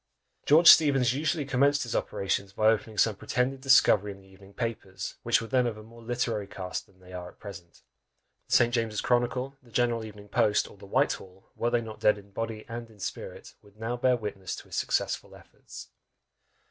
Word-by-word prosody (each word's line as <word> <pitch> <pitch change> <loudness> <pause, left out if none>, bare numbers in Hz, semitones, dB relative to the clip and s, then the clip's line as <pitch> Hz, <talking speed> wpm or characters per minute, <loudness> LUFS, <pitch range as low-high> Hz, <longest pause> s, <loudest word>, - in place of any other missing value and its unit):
George 160 +4 +6
Steevens 135 -6 +7
usually 150 +1 -1
commenced 140 +2 +2
his 120 - -4
operations 100 0 -2
by 110 +1 +2
opening 110 -1 -1
some 110 0 +3
pretended 125 +6 -1
discovery 110 -6 +4
in 100 - -11
the 95 - -20
evening 95 +1 -17
papers, 110 -3 -5
which - - +2
were 115 - -6
then 125 0 +2
of 110 -2 -4
a 110 - -11
more 115 +2 -15
literary 115 -3 -2
cast 95 -2 -6
than 95 -1 -26
they 90 0 -15
are 90 -1 -6
at - - -20
present; 95 -4 -11 0.6
the - - +2
St. 120 0 +4
James's 115 -3 -1
Chronicle, 125 +2 0
the 125 - -21
General 115 0 0
Evening 105 -1 -11
Post, 105 +1 +2
or - - -15
the 100 0 -14
Whitehall, 95 -1 -2
were 120 - 0
they 120 0 +1
not 110 -1 -9
dead 105 - +3
in 100 0 -15
body 110 +1 -5
and 115 0 -7
in 110 -2 -19
spirit, - - -7
would 105 0 -22
now 115 +2 -2
bear 125 0 +2
witness 100 -4 -5
to - - -10
his - - -9
successful - - -1
efforts. - - -13
115 Hz, 200 wpm, -28 LUFS, 100-125 Hz, 0.6 s, Steevens